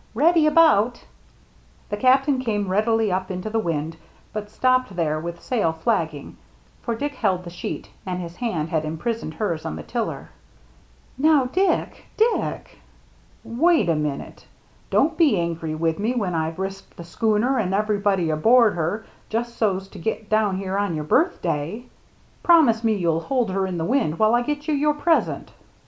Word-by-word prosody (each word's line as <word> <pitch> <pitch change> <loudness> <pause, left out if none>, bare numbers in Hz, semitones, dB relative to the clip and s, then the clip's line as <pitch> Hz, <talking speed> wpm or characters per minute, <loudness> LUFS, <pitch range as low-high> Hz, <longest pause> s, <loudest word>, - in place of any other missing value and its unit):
Ready 315 +4 +4
about! 300 -8 +4 0.4
" - - -32
The - - 0
Captain 265 +4 +3
came 210 -6 -1
rapidly 220 +2 +1
up 185 +1 -2
into 185 +3 -4
the 225 - +1
wind, 165 -4 -2 0.4
but 210 -1 -5
stopped 255 -2 +1
there 155 -3 0
with 170 +1 -6
sail 220 -10 +1
flapping; 160 -5 -2 0.4
for 235 - -2
Dick 285 +5 -3
held 185 -8 0
the 175 - -9
sheet, 175 - -6
and 180 -1 -4
his 170 -1 -7
hand 175 -11 -2
had 160 -1 0
imprisoned 160 +3 -4
hers 170 -5 -2
on 75 - -4
the 80 - -7
tiller. 75 - -4 0.5
" - - -32
Now, 300 -2 +4
Dick 370 +10 0
— - - -32
Dick 455 +2 0 0.2
— - - -31 0.2
" - - -32
" - - -35
Wait 315 - +2
a 165 - +3
minute. 150 -2 -4 0.4
Don't 320 +3 +2
be 300 - +4
angry 165 -2 -3
with 165 +1 -1
me 225 +5 0
when 200 -7 -1
I've 160 0 -2
risked 195 +1 -6
the 170 - -8
schooner 220 +8 +1
and 190 -4 -1
everybody 200 -4 +1
aboard 225 +8 +4
her 175 +7 -2 0.2
just 235 +1 -2
so's 195 -4 0
to 195 - -11
get 215 +3 -4
down 215 -3 +2
here 195 0 -3
on 200 -5 -1
your 155 - -3
birthday. 175 - 0 0.6
Promise 280 -10 +5
me 220 -1 +2
you'll 165 -4 0
hold 245 -2 -1
her 190 0 0
in 180 -2 -4
the 165 - -2
wind 225 - 0
while 215 +1 +3
I 240 - +4
get 295 +4 -3
you 310 - +1
your 295 +1 +2
present." 320 +2 0
210 Hz, 185 wpm, -23 LUFS, 170-245 Hz, 0.6 s, Promise